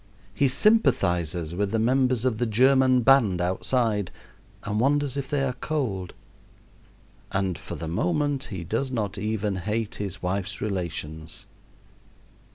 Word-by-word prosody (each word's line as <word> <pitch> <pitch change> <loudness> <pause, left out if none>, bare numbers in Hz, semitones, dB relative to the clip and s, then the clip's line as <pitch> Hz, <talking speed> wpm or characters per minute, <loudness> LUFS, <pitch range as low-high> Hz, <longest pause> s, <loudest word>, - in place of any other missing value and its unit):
He 140 - +2
sympathizes 90 - +2
with 100 +3 -1
the 115 - 0
members 125 +1 +2
of 115 -4 0
the 120 - +1
German 130 +3 +4
band 115 -8 +4
outside 105 +3 0 0.5
and 105 +1 -2
wonders 140 +1 +2
if 140 -1 -4
they 145 -2 0
are 130 -2 0
cold; 120 - -3 1.2
and 95 -2 0
for - - -7
the 80 - -6
moment 145 - 0
he 95 -6 -6
does 115 +10 -2
not 105 -7 -3
even 105 -1 -1
hate 105 +4 -2
his 100 -2 -5
wife's 95 +2 -2
relations. 80 -5 -4
110 Hz, 135 wpm, -26 LUFS, 95-130 Hz, 1.2 s, German